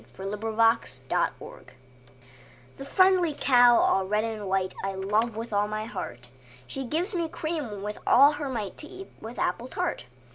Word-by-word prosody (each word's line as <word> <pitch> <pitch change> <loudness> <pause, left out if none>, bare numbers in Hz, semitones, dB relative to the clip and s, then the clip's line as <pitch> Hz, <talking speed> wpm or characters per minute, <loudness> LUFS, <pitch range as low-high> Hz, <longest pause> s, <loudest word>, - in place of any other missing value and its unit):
XXIII 190 +10 -6
The 220 - +1
Cow - - -2 1.2
The 275 - -8
friendly 365 -1 +3
cow 245 -2 +6
all 190 - +3
red 210 +2 +1
and 220 -3 -4
white, 190 -1 0
I 195 0 -2
love 210 +4 0
with 225 0 -6
all 205 0 +2
my 215 0 -4
heart: 125 - -7 0.3
She 270 - -5
gives 340 - -2
me 340 -3 -1
cream 295 -13 -4
with 210 0 -5
all 280 +4 +7
her 290 -2 -4
might, 215 -7 -4
To 305 - -8
eat 380 +2 -11
with 230 +2 -8
apple 240 - -1
tart. 125 - -3
225 Hz, 170 wpm, -27 LUFS, 205-285 Hz, 1.2 s, all